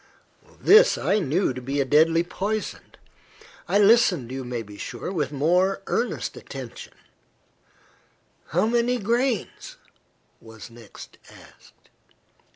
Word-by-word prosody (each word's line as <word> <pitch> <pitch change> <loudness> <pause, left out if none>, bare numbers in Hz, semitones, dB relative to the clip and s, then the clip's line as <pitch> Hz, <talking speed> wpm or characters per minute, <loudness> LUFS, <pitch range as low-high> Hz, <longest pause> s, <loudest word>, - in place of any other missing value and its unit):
This 450 +5 +6
I 205 - +1
knew 170 -2 0
to 130 - -8
be 135 +3 -3
a 140 - +1
deadly 165 +4 +3
poison. 205 +4 -5 0.7
I - - +2
listened, 200 - +3
you 130 0 -5
may 120 -2 -5
be 105 -1 -13
sure, 140 - -6
with 150 -8 -2
a 145 - -9
more 180 +7 +1
earnest 240 +2 -2
attention. - - -10 1.5
"How - - +1
many 240 +2 +1
grains?" 235 +1 -2 0.6
was 110 0 -13
next 115 -3 -14
asked. - - -19
175 Hz, 120 wpm, -24 LUFS, 130-215 Hz, 1.5 s, This